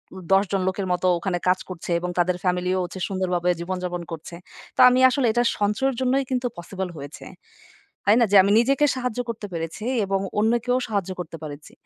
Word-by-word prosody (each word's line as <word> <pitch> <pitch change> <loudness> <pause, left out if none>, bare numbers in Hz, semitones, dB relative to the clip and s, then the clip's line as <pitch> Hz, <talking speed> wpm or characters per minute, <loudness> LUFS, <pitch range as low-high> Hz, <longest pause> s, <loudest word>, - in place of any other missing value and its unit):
উম 190 - -8
১০ 195 +1 +5
জন 195 -1 +1
লোকের 190 0 -2
মতো 180 +1 0
ওখানে 175 0 -1
কাজ 185 0 +3
করছে 180 -1 -6
এবং 180 - -4
তাদের 175 +1 +2
ফ্যামিলিও 180 0 0
হচ্ছে 180 +1 -7
সুন্দরভাবে 180 -2 -1
জীবনযাপন 180 0 -3
করছে। 165 +1 -7 0.4
তো - - -9
আমি 250 +1 +2
আসলে 265 0 0
এটা 240 +2 +2 0.2
সঞ্চয়ের 235 +6 +1
জন্যই 260 +2 +2
কিন্তু 250 -1 0
পসিবল 185 +2 -5
হয়েছে। 145 +1 -9 0.8
হয় 210 +3 +5
না 235 - +5
যে - - +4
আমি 200 - +2
নিজেকে 275 +4 +3
সাহায্য 250 -2 -3
করতে 220 -2 -5
পেরেছি 165 +5 -5 0.2
এবং 195 0 0 0.2
অন্যকেও 235 +3 +2
সাহায্য 200 -4 -2
করতে 165 -1 -6
পেরেছি। 150 -1 -9
190 Hz, 185 wpm, -23 LUFS, 180-230 Hz, 0.8 s, ১০